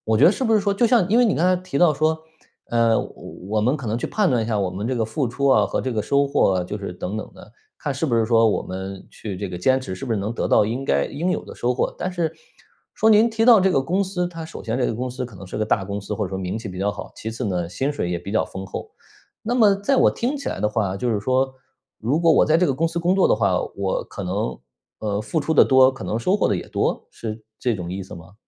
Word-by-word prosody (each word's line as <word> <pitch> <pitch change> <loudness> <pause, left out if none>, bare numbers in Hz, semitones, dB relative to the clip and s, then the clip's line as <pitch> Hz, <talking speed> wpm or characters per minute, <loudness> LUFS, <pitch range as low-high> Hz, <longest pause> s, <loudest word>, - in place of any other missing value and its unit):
我 110 0 +2
觉 - - +5
得 180 - +7
是 265 - -4
不 225 -2 +3
是 215 - +4
说， 200 0 +1
就 215 +4 +2
像 230 -6 +4
因 230 - +4
为 245 - +6
你 210 - +2
刚 165 - +1
才 185 0 +4
提 185 -6 -5
到 170 0 +5
说， 155 +2 +1 0.5
呃， 115 -1 +3
我 - - -5 0.4
我 110 0 +1
们 125 +7 +2
可 140 -5 -7
能 110 +2 -1
去 - - -3
判 210 -5 +1
断 120 -3 +2
一 - - -3
下， 110 -2 0
我 95 -2 0
们 95 +4 -4
这 130 +1 -1
个 115 - +1
付 115 +4 -2
出 140 +4 -1
啊 130 - +5
和 - - -2
这 130 - -2
个 110 - 0
收 140 +6 +2
获 120 -8 +2
啊， 90 - -1
就 105 +4 -5
是 100 - -5
等 95 +4 -4
等 - - -7
的， 105 - -15 0.3
看 145 - -2
是 140 +4 -2
不 120 - 0
是 115 - +3
说， 115 0 +4
我 105 - 0
们 95 +1 -7
去 100 -4 -7
这 100 +2 -4
个 90 - -5
坚 130 +9 +3
持 95 -8 -6
是 95 - -7
不 115 - -1
是 110 - 0
能 100 +3 -2
得 - - -2
到 - - +5
应 120 +6 -3
该 70 0 +2
应 165 +6 -2
有 - - -2
的 - - -10
收 125 +1 0
获。 125 - -1
但 185 - -2
是， 175 -3 -1 0.6
说 220 - +3
您 220 +2 +6
提 225 0 0
到 235 -3 +8
这 190 +1 +3
个 135 - +2
公 180 +8 0
司， 185 -2 -2
它 165 -2 -7
首 160 - -9
先 115 +2 -2
这 125 - +1
个 - - -2
公 125 +3 -3
司 125 0 -4
可 115 -5 -14
能 95 - -10
是 90 - -6
个 110 - 0
大 100 -2 +1
公 100 +1 -4
司， 100 - -5
或 105 - -2
者 90 - -6
说 95 - -3
名 95 +3 -3
气 110 - -8
比 90 -1 -7
较 100 +2 +1
好， - - -8
其 110 - -6
次 115 - -5
呢， 90 -4 -1
薪 135 +11 -2
水 90 -11 -3
也 85 - -1
比 100 - -7
较 110 - +3
丰 95 +1 -7
厚。 95 - -7 0.5
那 235 +3 -1
么 215 -5 +5
在 205 +8 +1
我 - - +5
听 255 +5 -2
起 280 - -4
来 - - -4
的 105 - +2
话， 105 -3 -1
就 120 +5 -2
是 105 -2 0
说， 130 +4 +1 0.4
如 135 +9 0
果 165 -1 +5
我 - - +5
在 155 +1 +3
这 180 - +3
个 135 - +1
公 160 +5 +1
司 165 +1 -3
工 175 +2 +2
作 195 - +4
的 - - +4
话， 100 -4 +1 0.2
我 95 -1 -1
可 100 - -8
能， 100 +4 -2 0.4
呃， 105 -1 -2
付 110 +10 -1
出 150 +2 -1
的 - - +7
多， 130 0 +5
可 135 - -9
能 110 - -1
收 185 - +2
获 - - +2
的 100 - +1
也 - - -7
多？ - - -1
是 110 -1 -7 0.2
这 120 -2 0
种 90 -3 -5
意 95 +2 -4
思 95 - -10
吗？ 85 +4 -13
120 Hz, 335 characters per minute, -22 LUFS, 100-165 Hz, 0.6 s, 到